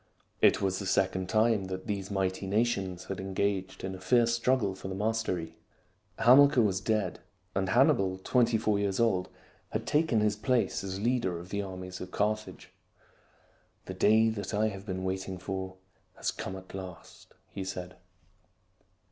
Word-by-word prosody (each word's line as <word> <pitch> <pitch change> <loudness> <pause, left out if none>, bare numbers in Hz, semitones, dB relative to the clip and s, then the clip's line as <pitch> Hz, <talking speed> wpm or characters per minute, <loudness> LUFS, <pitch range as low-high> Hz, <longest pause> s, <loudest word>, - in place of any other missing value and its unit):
It - - +5
was 95 -1 0
the 100 - -4
second 95 -1 +1
time 110 -2 +3
that 95 0 -5
these 100 -3 -3
mighty 95 -1 -1
nations 100 -4 0
had 95 - -5
engaged 95 0 -2
in 95 0 -3
a 95 - -8
fierce 115 +5 +3
struggle 115 -4 +1
for 95 - -8
the 95 - -4
mastery. 95 -6 -2 0.6
Hamilcar 130 +1 +6
was 95 -3 +1
dead; 105 -4 -1 0.3
and 95 0 0
Hannibal, 95 0 +3
twenty 115 +4 +2
four 105 -2 +1
years 100 0 -1
old, 100 -6 +2 0.4
had - - -3
taken 150 -7 +2
his 105 0 +2
place 120 -1 0
as 95 0 -4
leader 115 -6 0
of 85 +2 -10
the 100 +1 -2
armies 95 -1 -7
of 90 - -6
Carthage. 105 +2 -2 0.6
" - - -36
The 95 - -6
day 110 +4 +4
that 105 -1 -4
I 110 +1 +2
have 100 0 -9
been 95 -1 -3
waiting 95 0 -3
for 95 0 -5 0.4
has - - -1
come 95 - -6
at 95 0 -11
last," 95 -2 -10 0.2
he 95 - -5
said. 90 -1 -6
95 Hz, 165 wpm, -30 LUFS, 95-110 Hz, 0.6 s, Hamilcar